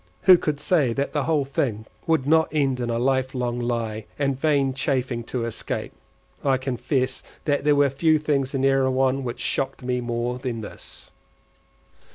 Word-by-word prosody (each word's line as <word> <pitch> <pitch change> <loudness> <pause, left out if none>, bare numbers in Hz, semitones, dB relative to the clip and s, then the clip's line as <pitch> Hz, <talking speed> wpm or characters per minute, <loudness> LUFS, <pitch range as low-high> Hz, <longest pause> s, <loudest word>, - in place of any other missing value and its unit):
Who 185 - +9
could 150 -4 -1
say 145 -10 +2
that 140 +4 -2
the 145 -3 0
whole 150 -2 +1
thing 120 -5 -2 0.2
would 160 -5 +2
not 160 +2 +4
end 135 -4 +1
in 120 -1 -2
a 115 - 0
life 130 +1 0
long 120 -1 -1
lie, 115 -3 -2
and 140 -1 0
vain 140 -1 +1
chafing 130 -3 -1
to 120 -1 -3
escape? 115 - -4 0.5
I 135 -2 +3
confess 130 0 -1 0.2
that 145 -2 +1
there 150 -1 +5
were 145 0 +4
few 155 +3 +3
things 140 -3 -1
in 135 0 +1
Erewhon 135 0 +2
which 120 -1 -5
shocked 135 -1 -2
me 125 0 -1
more 120 +1 -2
than 120 -3 -4
this. 105 - -10
130 Hz, 175 wpm, -24 LUFS, 125-140 Hz, 0.5 s, Who